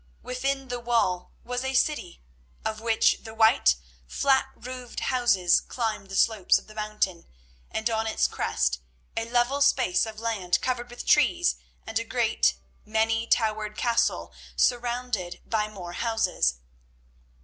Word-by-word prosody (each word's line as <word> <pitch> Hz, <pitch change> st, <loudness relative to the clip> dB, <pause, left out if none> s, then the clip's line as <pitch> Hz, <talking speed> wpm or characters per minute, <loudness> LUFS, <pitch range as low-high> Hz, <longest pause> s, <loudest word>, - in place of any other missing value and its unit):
Within 270 Hz, +1 st, -2 dB
the 245 Hz, 0 st, -3 dB
wall 230 Hz, -7 st, 0 dB
was 245 Hz, +1 st, -3 dB
a 265 Hz, 0 st, -2 dB
city 260 Hz, -, 0 dB, 0.4 s
of 215 Hz, 0 st, -3 dB
which 225 Hz, -1 st, +3 dB
the 220 Hz, -1 st, -10 dB
white, 220 Hz, -, +5 dB, 0.3 s
flat 270 Hz, -, +2 dB
roofed 255 Hz, -1 st, -7 dB
houses 195 Hz, -9 st, +3 dB
climbed 220 Hz, -5 st, -3 dB
the 195 Hz, -, -6 dB
slopes 215 Hz, -2 st, +3 dB
of -, -, -10 dB
the 215 Hz, -, -14 dB
mountain, 210 Hz, -5 st, -2 dB, 0.4 s
and 220 Hz, +1 st, -1 dB
on 225 Hz, -1 st, 0 dB
its 220 Hz, -, +1 dB
crest 60 Hz, -1 st, -1 dB, 0.4 s
a 225 Hz, +1 st, -2 dB
level 245 Hz, +4 st, +1 dB
space 245 Hz, -8 st, +3 dB
of 215 Hz, -1 st, -8 dB
land 210 Hz, -6 st, 0 dB
covered 245 Hz, -1 st, -2 dB
with 240 Hz, -, -8 dB
trees 345 Hz, +4 st, +3 dB, 0.3 s
and 220 Hz, 0 st, -1 dB
a -, -, -3 dB
great, 235 Hz, -1 st, +1 dB, 0.3 s
many 225 Hz, +1 st, 0 dB
towered 215 Hz, -2 st, 0 dB
castle 235 Hz, -2 st, +1 dB, 0.2 s
surrounded 240 Hz, -7 st, 0 dB
by 215 Hz, -2 st, 0 dB
more 185 Hz, -5 st, -8 dB
houses. 185 Hz, -, +1 dB
225 Hz, 140 wpm, -26 LUFS, 210-245 Hz, 0.4 s, white